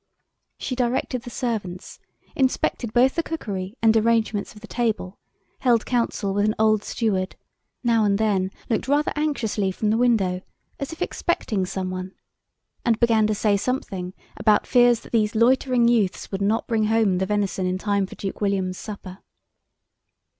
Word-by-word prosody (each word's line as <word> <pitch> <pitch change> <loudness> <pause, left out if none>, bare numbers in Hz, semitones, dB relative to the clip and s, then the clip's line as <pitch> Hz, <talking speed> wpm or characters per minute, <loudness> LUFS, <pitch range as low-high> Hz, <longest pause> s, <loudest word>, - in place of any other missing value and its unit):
She 260 - -4
directed 250 0 -1
the 240 - -9
servants, 215 -8 -4 0.4
inspected 260 -3 0
both 250 +3 +4
the 335 - 0
cookery 205 - -5
and 225 0 +5
arrangements 220 -2 +1
of 210 - -13
the - - -9
table, 220 -6 -2 0.4
held 240 -4 +3
council 230 -5 0
with 205 +1 +1
an 215 - +1
old 215 -1 +3
steward, 195 -6 -1 0.5
now 230 -2 +3
and 200 -1 +2
then 200 -3 +1 0.2
looked 230 +1 -1
rather 290 +2 +2
anxiously 230 -10 0
from 210 +3 -1
the 225 - +1
window, 200 -7 +2 0.4
as 275 +3 -4
if 325 - -3
expecting 210 - -1
some 185 0 -3
one, 185 +1 -6 0.7
and 225 -2 +2
began 225 -3 +4
to 215 - 0
say 205 0 +2
something 195 -5 -3 0.2
about 210 -1 +3
fears 245 -2 +4
that - - -14
these 220 -1 +1
loitering 245 +1 +3
youths 220 -6 +1
would 195 0 -3
not 210 +3 +1
bring 220 -2 +1
home 215 -4 +2
the 190 - 0
venison 200 -2 0
in 185 0 -1
time 200 -1 0
for - - -11
Duke 195 +1 -5
William's 190 -2 0
supper. 195 -3 -8
215 Hz, 165 wpm, -23 LUFS, 195-240 Hz, 0.7 s, and